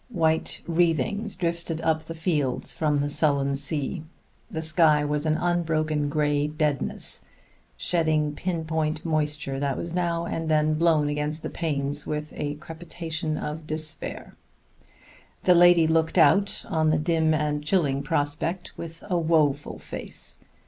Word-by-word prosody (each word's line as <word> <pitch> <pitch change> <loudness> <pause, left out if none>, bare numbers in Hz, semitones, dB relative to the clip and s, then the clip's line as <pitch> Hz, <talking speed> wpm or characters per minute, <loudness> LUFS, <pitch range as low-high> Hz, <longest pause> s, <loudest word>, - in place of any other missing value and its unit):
White 160 -7 0
wreathings 175 - +1
drifted 170 -2 -2
up 160 -1 +1
the 165 +1 -8
fields 155 -6 -1
from 150 -2 +1
the 145 0 0
sullen 140 -2 +1
sea; 145 +4 0 0.5
the 160 -7 -4
sky 155 -2 +4
was 150 +1 -1
an 155 0 +2
unbroken 155 -4 0
gray 145 -1 +1
deadness 150 -2 -2 0.5
shedding 155 - +1
pin 170 0 -3
point 155 0 -2
moisture 150 -4 0
that 140 -1 -1
was 170 0 -5
now 170 -1 0
and 165 -1 -3
then 155 0 +3
blown 155 -2 +3
against 150 +2 -2
the - - -4
panes 145 -3 -2
with 150 0 -4
a 145 0 -3
crepitation 160 0 -5
of 155 +1 -5
despair. 155 0 0 1.1
The 180 - +6
lady 175 -1 +6
looked 160 +2 +1
out 195 +4 +4
on 155 -1 +1
the 155 - +3
dim 160 0 +2
and 150 -1 -1
chilling 150 -5 +1
prospect 160 +6 -2
with 165 0 -8
a 180 -3 +1
woeful 155 -4 +1
face. - - -6
155 Hz, 140 wpm, -25 LUFS, 150-165 Hz, 1.1 s, The